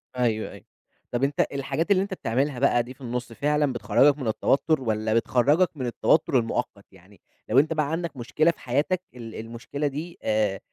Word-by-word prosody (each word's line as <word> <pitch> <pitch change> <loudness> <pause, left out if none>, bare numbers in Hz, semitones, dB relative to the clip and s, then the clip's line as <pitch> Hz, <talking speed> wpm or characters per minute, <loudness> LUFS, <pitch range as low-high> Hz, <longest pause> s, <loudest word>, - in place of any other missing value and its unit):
أيوه، 115 -3 0
أيوه. - - -13 0.5
طَب 120 +2 -1
أنت 140 +1 +2
الحاجات 140 +6 -2
اللي 190 -1 +4
أنت 200 0 -5
بتعملها 135 -3 -1
بقى 120 -3 +3
دي 125 +2 -10
في 130 - -25
النُص 120 -1 -4
فعلًا 150 +1 +1
بتخرجك 120 +6 +3
من 130 -5 -4
التوتر، 135 +6 +1
والَّا 110 -2 -1
بتخرجك 145 +9 +2
من 130 - -3
التوتر 130 +3 +2
المؤقت؟ 115 -3 -3
يعني 95 +1 -20 0.3
لو 125 - +5
أنت 155 +3 +2
بقى 155 -2 0
عندك 165 -3 -3
مشكلة 155 +7 +2
في - - -21
حياتك 145 +9 0
ال 115 -2 -9
المشكلة 115 +6 -4
دي 155 +5 -6
آآ، 105 -3 +1
130 Hz, 185 wpm, -25 LUFS, 115-150 Hz, 0.5 s, لو